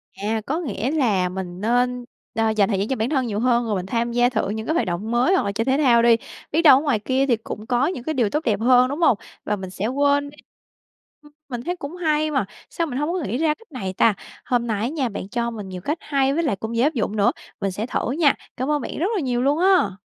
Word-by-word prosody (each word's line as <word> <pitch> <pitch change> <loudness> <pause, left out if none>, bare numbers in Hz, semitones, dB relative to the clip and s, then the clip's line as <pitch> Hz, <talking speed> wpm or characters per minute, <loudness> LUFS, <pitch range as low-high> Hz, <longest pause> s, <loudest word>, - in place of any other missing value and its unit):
À, 215 +2 -2
có 310 +5 -1
nghĩa 250 - -2
là 215 -12 +1
mình 180 -1 -6
nên, 245 +2 +1 0.3
ơ, 225 -1 +2
dành 215 -2 +2
thời 195 -3 0
gian 200 - -1
cho 265 - -1
bản 225 +1 -1
thân 265 -5 0
nhiều 210 -2 -2
hơn, 240 0 +2
rồi 215 -2 -1
mình 185 -1 -3
tham 235 +3 -1
gia 245 +1 +3
thử 220 -5 -1
những 220 +1 -4
cái 315 - +1
hoạt 335 - +1
động 180 +6 -3
mới 245 +10 +3
hoặc - - +2
là 200 - -1
chơi 225 +3 -2
thể 265 +1 +2
thao 250 -6 +4
đi, 235 0 +6 0.4
biết 320 - +2
đâu 295 -6 +8
ở - - 0
ngoài 280 -8 +1
kia 260 +5 +1
thì 245 - +4
cũng 215 -1 -8
có 250 +2 +2
những 275 -9 -4
cái 315 - -2
điều 240 -7 +1
tốt 300 +8 -1
đẹp 215 -7 +1
hơn, 250 +2 +5
đúng 285 +4 -4
hông? 285 -10 +4 0.3
Và 210 - -1
mình 190 -2 -7
sẽ 195 +3 -3
quên 285 +2 +1
đi 290 - -16 0.9
ừm, 295 0 -18 0.2
mình 245 -2 -4
thấy 355 +5 -2
cũng 310 -1 -7
hay 310 -3 0
mà, 270 -8 +1 0.2
sao 335 -1 -2
mình 250 - -4
hổng 295 +3 -1
có 370 - -1
nghĩ 235 +6 -2
ra 310 0 +2
cách 455 +3 -21
này 195 -9 -4
ta? 215 +3 +4 0.3
Hôm 240 -1 0
nay 215 -3 -1
á 230 - 0
nha, 280 -5 -1
bạn 200 -2 -6
cho 235 +1 -1
mình 210 -4 -7
nhiều 185 -1 -7
cách 295 - -2
hay 275 -2 +1
với 335 +3 0
lại 285 -10 +1
cũng 220 +4 -5
dễ 230 - +2
áp 300 +3 +2
dụng 215 -5 -2
nữa, 205 -1 +3 0.3
mình 195 - 0
sẽ 205 +4 -3
thử 245 - -2
nha. 295 0 +3 0.2
Cảm 260 +3 -1
ơn 295 -1 +1
bạn - - -6
rất 335 - 0
là 390 - 0
nhiều 245 -3 0
luôn 285 +4 +2
á! 370 - +4
245 Hz, 285 wpm, -22 LUFS, 215-285 Hz, 0.9 s, đâu